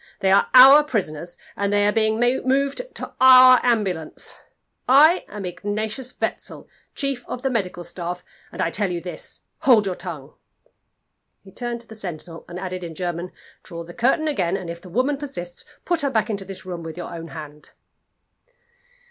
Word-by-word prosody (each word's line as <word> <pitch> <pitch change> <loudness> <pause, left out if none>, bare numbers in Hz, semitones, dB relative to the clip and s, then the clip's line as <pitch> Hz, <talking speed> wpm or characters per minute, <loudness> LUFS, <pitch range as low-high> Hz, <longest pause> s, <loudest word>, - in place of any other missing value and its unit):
They 190 - +2
are 195 - +4
our 270 +4 +10
prisoners, 175 - -3 0.2
and 200 0 -1
they 205 0 +3
are 205 - +3
being 220 0 +1
moved 265 - +1
to - - -7
our 255 -1 +9
ambulance. 195 -10 -1 0.5
I 310 +7 +6
am 205 -2 -7
Ingatius 215 +7 -4
Wetzel, - - -4 0.3
chief 275 -3 -2
of 250 - -6
the 265 - 0
medical 185 -6 -2
staff 175 0 -6 0.3
and - - -3
I 165 - -1
tell 205 0 0
you 175 -1 -3
this. 180 +1 -6 0.2
Hold 230 -6 +5
your 190 - -1
tongue." - - -8 1.1
He 195 - -15
turned 240 +3 -5
to 235 - -16
the - - -11
sentinel 175 -5 -8
and 175 - -7
added 185 -1 -5
in 165 -2 -7
German, 175 0 -4 0.3
"Draw 170 -2 -8
the 175 +1 -12
curtain 265 - +1
again; 195 - 0
and 180 -3 -6
if 170 0 -9
the 180 - -12
woman 255 +9 0
persists, 180 -12 -6 0.2
put 345 -2 0
her 280 - 0
back 225 -3 0
into 200 -2 -4
this 195 0 -9
room 175 -2 -6
with 165 0 -8
your 175 - -6
own 165 -1 -7
hand." 150 -2 -10
200 Hz, 180 wpm, -22 LUFS, 175-255 Hz, 1.1 s, our